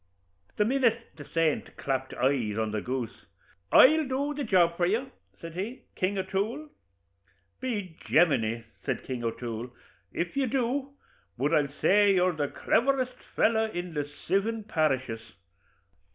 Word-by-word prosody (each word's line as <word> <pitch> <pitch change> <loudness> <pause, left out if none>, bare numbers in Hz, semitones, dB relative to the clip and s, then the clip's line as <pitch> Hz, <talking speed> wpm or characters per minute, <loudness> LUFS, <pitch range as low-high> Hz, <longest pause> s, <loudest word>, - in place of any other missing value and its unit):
The 210 - +3
minute 235 -2 +1
the 145 - -10
saint 165 -2 0
clapt 130 -1 -2
his - - -9
eyes 125 -5 +1
on 110 -1 -1
the 105 -1 -2
goose, 125 -1 -5 0.4
'I'll 310 +2 +7
do 280 +3 -1
the 290 0 -3
job 175 -6 +3
for 175 0 +1
you,' 240 +7 -1 0.3
says 165 -1 -8
he, 210 +9 -5
'King 190 +2 0
O'Toole.' 205 +10 -2 0.9
'By 210 -9 -3 0.2
Jaminee!' 120 -9 +3 0.2
says - - -1
King 125 -2 -4
O'Toole, 115 +1 -4 0.4
'if 170 0 -3
you 275 -1 +1
do, 265 +3 -1 0.4
bud 145 +6 0
I'll 145 -3 +2
say 205 0 +5
you're 180 0 +3
the 150 -3 -1
cleverest 255 - +1 0.2
fellow 220 0 +3
in 175 -3 -5
the 145 -1 -2 0.2
sivin 215 +4 +1
parishes.' 135 - 0
180 Hz, 145 wpm, -28 LUFS, -, 0.9 s, I'll